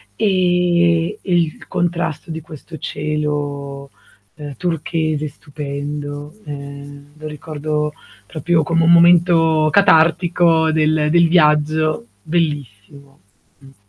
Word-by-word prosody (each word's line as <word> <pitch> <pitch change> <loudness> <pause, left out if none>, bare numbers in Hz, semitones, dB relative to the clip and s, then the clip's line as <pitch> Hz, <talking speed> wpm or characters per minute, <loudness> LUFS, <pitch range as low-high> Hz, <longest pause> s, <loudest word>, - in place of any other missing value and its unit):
E 175 -1 +1
il 170 -4 -1
contrasto 170 -2 -2
di 160 - -5
questo 160 0 -11
cielo, 145 -2 -4 0.5
ehm, 145 -2 -8
turchese 155 -2 -2
stupendo, 145 0 -7
ehm, 140 0 -10
lo 155 - -11
ricordo 150 0 -4 0.3
proprio 160 +1 0
come 165 +1 +1
un 165 - +4
momento 170 -2 +4
catartico 170 -3 +3
del 155 -1 +1
del 170 0 +4
viaggio, 155 -3 +2 0.2
bellissimo. 140 -4 -4 0.4
Mh. 135 0 -18
155 Hz, 95 wpm, -18 LUFS, 145-170 Hz, 0.5 s, un